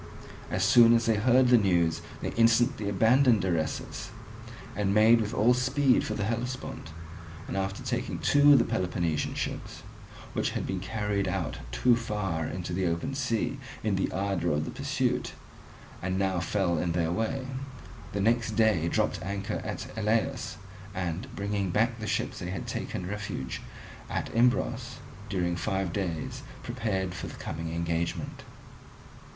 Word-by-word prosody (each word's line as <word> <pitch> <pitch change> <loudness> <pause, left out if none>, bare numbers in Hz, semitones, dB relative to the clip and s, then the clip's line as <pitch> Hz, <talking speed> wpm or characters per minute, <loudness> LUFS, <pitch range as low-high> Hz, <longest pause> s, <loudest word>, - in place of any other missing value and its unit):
As - - 0
soon 120 -1 +7
as 115 -1 +2
they 115 -2 +3
heard 125 +3 +4
the 125 -1 +7
news 85 -5 +2 0.2
they - - -1
instantly 115 -1 +3
abandoned 115 +1 +4
Eresus, 85 -4 -2 0.7
and 100 0 +1
made 115 +2 +6
with 105 -1 -2
all 120 0 +4
speed 130 +1 +3
for 110 - -3
the 105 - -1
Hellespont, 120 -5 -3 0.6
and - - -4
after 95 0 -2
taking - - -2
two 145 0 +6
of - - +8
the 115 - +3
Peloponnesian 90 -7 -1
ships - - -4 0.5
which - - 0
had - - -2
been 95 - -2
carried 100 0 -1
out 90 -4 -2
too 115 - +4
far 100 -9 -2
into 90 0 -4
the 95 0 +1
open 85 +11 -1
sea 130 0 -1 0.2
in 105 -2 +1
the 95 - 0
ardour 95 -4 0
of 75 +1 0
the - - -5
pursuit - - -1 0.7
and 95 +1 -1
now 95 -2 +1
fell 90 -2 0
in 85 0 0
their 85 -1 +1
way, 115 +8 -1 0.7
the 100 - -2
next 115 +1 +2
day 110 -7 +3
dropped - - 0
anchor 100 +1 -3
at - - -4
Elaeus, 110 0 0 0.4
and, 90 +5 -3
bringing 100 -2 -1
back 115 +6 +1
the 110 - -4
ships - - -1
that 90 - -4
had 90 -2 -4
taken 90 - -4
refuge 100 -9 -4 0.5
at - - -3
Imbros, 120 +1 +2 0.3
during 90 -4 0
five 95 0 -1
days 85 -5 -3 0.2
prepared 95 -4 -2
for 95 - -5
the - - -8
coming 80 +1 -5
engagement. 85 0 -2
100 Hz, 155 wpm, -29 LUFS, 90-115 Hz, 0.7 s, of